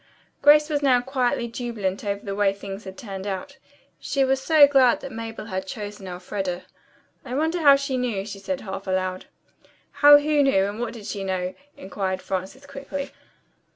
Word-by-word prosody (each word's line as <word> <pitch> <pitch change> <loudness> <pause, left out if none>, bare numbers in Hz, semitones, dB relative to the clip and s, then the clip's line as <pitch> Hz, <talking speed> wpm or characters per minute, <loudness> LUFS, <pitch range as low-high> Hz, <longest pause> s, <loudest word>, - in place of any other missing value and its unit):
Grace 300 +1 +6
was 295 -2 -1
now 260 -3 +4
quietly 245 -2 -1
jubilant 230 -5 -4
over 200 -1 -3
the 200 - -3
way 200 0 +2
things 195 +1 -8
had 190 0 -9
turned 195 -3 -7
out. 205 +9 -5 0.4
She 275 - 0
was 265 0 +1
so 310 0 +7
glad 270 -2 +3
Mabel 225 -1 -6
had 190 -3 -4
chosen 205 -2 -7
Elfreda. 180 0 -4 0.6
"I 250 - -5
wonder 320 +4 0
how 285 -2 +8
she 275 -1 -2
knew," 230 -6 -2
she 205 -1 -8
said 270 +8 -4
half 195 -1 -7
aloud. 185 0 -2 0.8
"How 290 0 +10
who 295 0 +2
knew, 230 -9 +3
and 205 +2 -5
what 235 -1 -3
did 220 -4 -10
she 200 -1 -4
know?" 185 -1 -2 0.2
inquired 190 -1 -3
Frances 190 +8 -5
quickly. 280 0 -6
225 Hz, 175 wpm, -24 LUFS, 195-275 Hz, 0.8 s, How